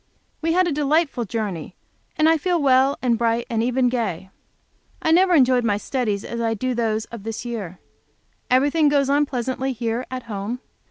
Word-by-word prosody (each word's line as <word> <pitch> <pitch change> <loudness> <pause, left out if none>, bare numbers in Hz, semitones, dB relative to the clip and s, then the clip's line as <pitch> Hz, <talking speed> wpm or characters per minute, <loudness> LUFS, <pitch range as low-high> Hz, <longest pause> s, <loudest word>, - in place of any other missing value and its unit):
We 330 0 +1
had 365 +1 +3
a - - 0
delightful 290 -3 +1
journey, 195 -6 -4 0.4
and 310 - +4
I 325 0 +4
feel 350 +2 0
well 270 -1 +3
and 235 -3 +2
bright, 235 0 +1
and 225 -1 +1
even 250 +2 +1
gay. 195 -7 -2 0.7
I 320 - 0
never 360 +1 +5
enjoyed 255 -4 +4
my 205 -3 +1
studies 210 -3 -2
as 235 0 -4
I 225 -1 0
do 255 +4 -2
those 225 -2 -1
of 235 -3 -7
this 225 +3 -6
year. 205 -7 -5 0.7
Everything 290 +4 +3
goes 280 -1 +2
on 290 +1 +3
pleasantly 260 0 -2
here 235 +1 -3
at 255 -1 -5
home. 215 +2 -5
250 Hz, 180 wpm, -22 LUFS, 225-285 Hz, 0.7 s, never